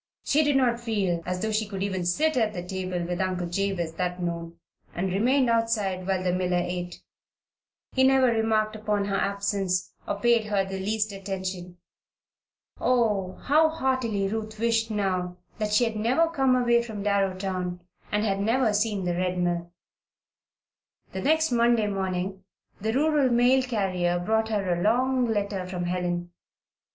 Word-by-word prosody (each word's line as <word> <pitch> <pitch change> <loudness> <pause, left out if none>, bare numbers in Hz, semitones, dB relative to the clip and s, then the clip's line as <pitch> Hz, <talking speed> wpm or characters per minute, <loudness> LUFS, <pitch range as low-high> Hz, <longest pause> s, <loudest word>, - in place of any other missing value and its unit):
She 305 +2 +3
did 290 -1 +2
not 245 -3 +2
feel 200 -7 -1
as 180 +1 -2
though 220 - 0
she 215 0 0
could 195 -2 -4
even 190 -3 -2
sit 310 - +1
at 220 -4 +1
the 175 -2 -5
table 185 -1 -3
with 175 +1 -2
Uncle 185 -1 -1
Jabez 175 -2 -2
that 180 0 -2
noon, 170 -1 -4 0.4
and 180 +1 -1
remained 250 +6 +3
outside 220 -5 0
while 190 -1 0
the 180 -1 +1
miller 180 -1 0
ate. 175 -1 -5 0.9
He 260 - +2
never 265 0 +5
remarked 220 -2 +1
upon 210 -2 -1
her 200 -1 -1
absence, 195 -2 -1
or 200 - -2
paid 235 0 +3
her 205 -2 0
the 190 0 -5
least 210 +2 -1
attention. 190 -2 -5 1.0
Oh, 210 -7 +1
how 310 +3 +4
heartily 260 -9 0
Ruth 215 +1 -4
wished 225 0 +1
now 185 -4 -1 0.2
that 210 -1 -1
she 215 +3 +4
had 225 -2 -1
never 250 +10 +2
come 270 -5 +3
away 240 -1 +3
from 220 -4 -6
Darrowtown 190 -3 -1 0.3
and 210 +1 +1
had 195 -2 0
never 225 +2 +2
seen 210 -2 0
the 175 - 0
Red 180 +1 -1
Mill. 175 -1 -1 1.4
The 190 - -4
next 315 +4 +2
Monday 235 -2 +3
morning 190 -1 -3 0.4
the 220 +2 -1
rural 290 +1 +2
mail 245 +2 +4
carrier 190 -8 0
brought 220 +5 0
her 200 -5 0
a 175 - -2
long 250 +4 +2
letter 200 -4 -2
from 180 -1 -4
Helen. 175 -1 -2
200 Hz, 165 wpm, -26 LUFS, 185-230 Hz, 1.4 s, never